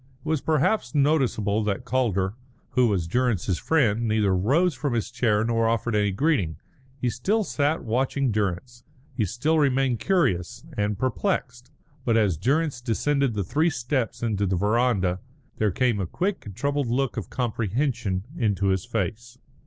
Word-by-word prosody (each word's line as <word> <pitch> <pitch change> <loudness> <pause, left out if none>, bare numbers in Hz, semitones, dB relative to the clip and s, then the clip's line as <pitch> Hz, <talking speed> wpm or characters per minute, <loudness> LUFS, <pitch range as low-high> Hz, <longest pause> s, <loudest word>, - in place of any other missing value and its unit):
It - - -12
was 155 -3 +1
perhaps 160 +4 +1
noticeable 130 -8 +2
that 100 -2 -2
Calder, 105 -7 0 0.4
who 125 -2 +3
was 95 -6 0
Durrance's 105 -4 0
friend, 120 -8 +2
neither 105 -3 +2
rose 145 - +2
from 140 -2 -2
his 115 0 -2
chair 110 -4 +1
nor 115 0 +1
offered 115 0 0
any 105 -1 +2
greeting. 100 - 0 0.4
He 125 -2 0
still 200 - 0
sat 150 -3 0
watching 130 +3 0
Durrance; 105 +4 -2 0.3
he 110 - +1
still 145 - 0
remained 135 -4 +2
curious 130 - 0
and 105 -1 -1
perplexed; 125 - -2 0.3
but 115 -2 +2
as 105 -6 +2
Durrance 135 - 0
descended 135 +1 0
the 100 - 0
three 150 - +1
steps 125 -4 -2
into 105 -3 0
the 95 - +1
verandah 100 -2 +1 0.4
there 110 - +3
came 120 +2 +1
a 95 - -2
quick 185 - -2
and 100 - -8
troubled 140 +1 -1
look 130 +2 0
of 110 -7 -5
comprehension 115 -3 -1
into 100 - +1
his 95 +2 0
face. 115 +2 -3
120 Hz, 160 wpm, -25 LUFS, 105-135 Hz, 0.4 s, who